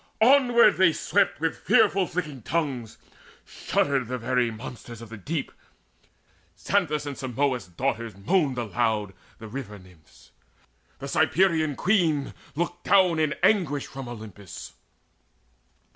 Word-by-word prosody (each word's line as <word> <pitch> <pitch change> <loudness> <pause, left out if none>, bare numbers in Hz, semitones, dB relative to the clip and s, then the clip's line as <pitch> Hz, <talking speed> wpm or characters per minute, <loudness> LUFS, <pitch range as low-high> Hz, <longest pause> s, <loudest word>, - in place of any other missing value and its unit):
Onward 245 -2 +5
they 180 -3 +5
swept - - +1
with - - -1
fearful 185 +2 +3
flickering 150 -7 -4
tongues: 130 -5 -3 0.5
Shuddered 135 -4 -1
the 125 +1 -3
very 125 0 0
monsters 115 +1 -9
of 115 -2 -11
the 115 - -8
deep: 145 - -4 1.1
Xanthus' 150 - 0
and 145 -1 -5
Simois' 130 -4 -1
daughters 115 -5 -2
moaned 135 - +1
aloud, 110 -3 -1 0.2
The 110 - -10
River 105 -3 -7
nymphs: 90 -5 -20 0.7
the 140 - -7
Cyprian 160 0 +2
Queen 165 -8 +1 0.2
looked 175 +2 -3
down 185 -4 +4
In 155 -2 +1
anguish 160 -10 +2
from 135 -2 -8
Olympus. 105 -5 -9
135 Hz, 120 wpm, -26 LUFS, 115-170 Hz, 1.1 s, Onward